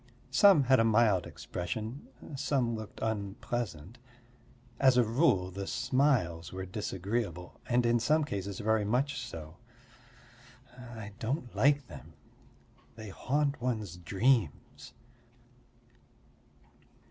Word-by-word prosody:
Some 175 +2 +6
had 130 0 +4
a - - +5
mild 110 -5 +3
expression, 110 - -5 0.3
some 130 -3 0
looked 110 -2 -7
unpleasant. 105 -2 -4 0.8
As 130 -2 +5
a 125 - +6
rule 115 - +2
the 95 +1 -5
smiles 100 - +1
were 95 0 -5
disagreeable, 95 -1 -4
and 120 0 +2
in 120 0 +3
some 155 +6 +2
cases 100 -7 -4
very 110 -1 +1
much 125 +6 0
so. 80 -8 -9 1.2
I 120 -4 -9
don't 125 +1 -3
like 140 +6 +3
them; - - -12 0.8
they 110 -2 -8
haunt 140 +6 -1
one's 110 -8 -2
dreams. 100 - -1
115 Hz, 105 wpm, -31 LUFS, 95-130 Hz, 1.2 s, Some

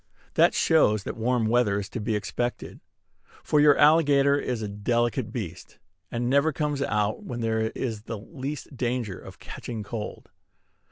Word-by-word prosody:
That - - +4
shows 110 -11 +3
that - - -5
warm 120 0 +1
weather 110 -3 +2
is 100 - -5
to 120 - -5
be 110 +1 -1
expected; 120 +4 -3 0.6
for 150 - +2
your 145 -1 +6
alligator 145 -2 +5
is 125 -5 -2
a - - -2
delicate 115 +4 -1
beast, - - -7 0.3
and 120 0 -2
never 140 +5 +3
comes 150 -1 -2
out 105 -5 0
when 120 -1 -5
there 110 -1 0
is 115 -5 -3
the 115 +1 -6
least 140 +5 -7
danger 120 -5 -2
of - - -12
catching 115 -3 -7
cold. 105 0 -7
120 Hz, 160 wpm, -26 LUFS, 110-140 Hz, 0.6 s, your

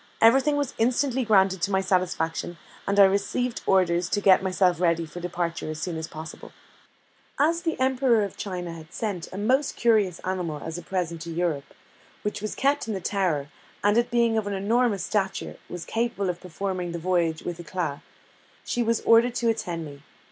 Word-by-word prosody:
Everything 270 +6 +5
was 285 -3 -1
instantly 255 +2 +2
granted 190 -4 +3
to 195 - +1
my 190 -1 +2
satisfaction, 180 -3 -1 0.3
and 200 +1 +2
I - - +10
received 200 +5 0
orders 180 -2 +3
to 205 - +1
get 195 -2 +5
myself 185 -2 +1
ready 170 -1 +2
for 160 +3 -9
departure 175 -2 -3
as 155 0 -5
soon 175 -3 -3
as 160 0 -4
possible. 160 0 -9 0.9
As 330 +4 +3
the 325 -5 -2
Emperor 260 -4 +3
of 200 - -5
China 180 -4 -5
had 160 -1 -11
sent 200 -6 -4
a 185 - -7
most 260 +8 +1
curious 215 -7 +2
animal 180 -5 -3
as 160 +2 -4
a - - -8
present 170 -2 -3
to 170 0 -6
Europe, 165 -4 -2 0.5
which 210 -1 -3
was 215 - -4
kept 280 -1 +1
in 220 - -2
the - - -2
Tower, 175 -7 -1 0.3
and 205 +1 +4
it 240 +1 +2
being 235 -2 +2
of 210 - -5
an 205 - -2
enormous 210 +1 +1
stature, 195 -3 -2
and 175 -2 -6
capable 225 -4 -1
of 175 - -12
performing 180 -1 -4
the - - -3
voyage 170 -2 0
with 175 -1 -5
éclat, 170 -4 -3 0.6
she 245 - -1
was 230 -1 +1
ordered 230 +1 +5
to 235 -2 +1
attend 180 -8 -2
me. 140 -1 -10
190 Hz, 190 wpm, -26 LUFS, 170-225 Hz, 0.9 s, I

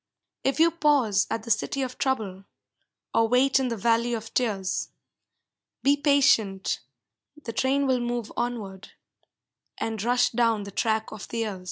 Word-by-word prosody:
If 270 +3 0
you 335 +1 +5
pause 280 -11 +2
at 225 0 -3
the 230 - -4
City 265 +6 0
of 255 -1 -6
Trouble, 210 -8 -2 0.7
Or 225 - +3
wait 255 +3 +3
in 265 - 0
the 230 -2 -3
Valley 235 +2 +1
of 225 0 -8
Tears, 205 -7 -1 0.9
Be 280 +1 +5
patient, 280 - +2 0.6
the 235 -6 -7
train 270 +4 +1
will 260 -2 +2
move 240 -2 -3
onward, 205 -6 -4 0.8
And 225 -2 -3
rush 245 +2 +2
down 230 -3 +1
the 200 - -8
track 220 +2 -1
of 215 - -8
the 235 - -6
years. 215 -4 -2
235 Hz, 155 wpm, -26 LUFS, 215-265 Hz, 0.9 s, you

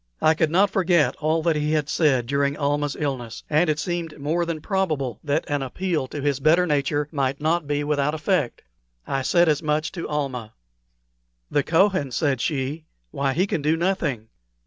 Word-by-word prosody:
I 155 - +4
could 160 -1 +1
not 190 +5 +3
forget 175 -5 +2
all 160 +1 0
that 165 -1 +2
he 150 +1 0
had 150 -2 +1
said 140 -7 +2
during 140 +2 0
Almah's 145 0 -1
illness, 130 -6 -4
and 155 +3 +3
it 150 - +1
seemed 170 -1 -4
more 165 +4 0
than 165 -2 -3
probable 155 - -1
that 150 +1 0
an 145 -1 -1
appeal 155 +2 -2
to 145 - -6
his 140 -2 +1
better 160 +5 +4
nature 145 -1 0
might 140 -2 -1
not 160 +1 0
be 145 0 0
without 150 0 0
effect. 155 -4 -1 0.4
I 135 - -1
said 170 +6 +3
as 150 -1 +2
much 155 0 0
to 170 -3 -6
Almah. 130 -7 -3 1.0
"The 145 - +3
Kohen," 170 -1 +2
said 135 -2 0
she; 145 +2 -2 0.3
"why, 140 -1 0
he 180 +6 +2
can 165 - -2
do 155 +3 +2
nothing." 160 - -1
150 Hz, 185 wpm, -23 LUFS, 140-165 Hz, 1.0 s, I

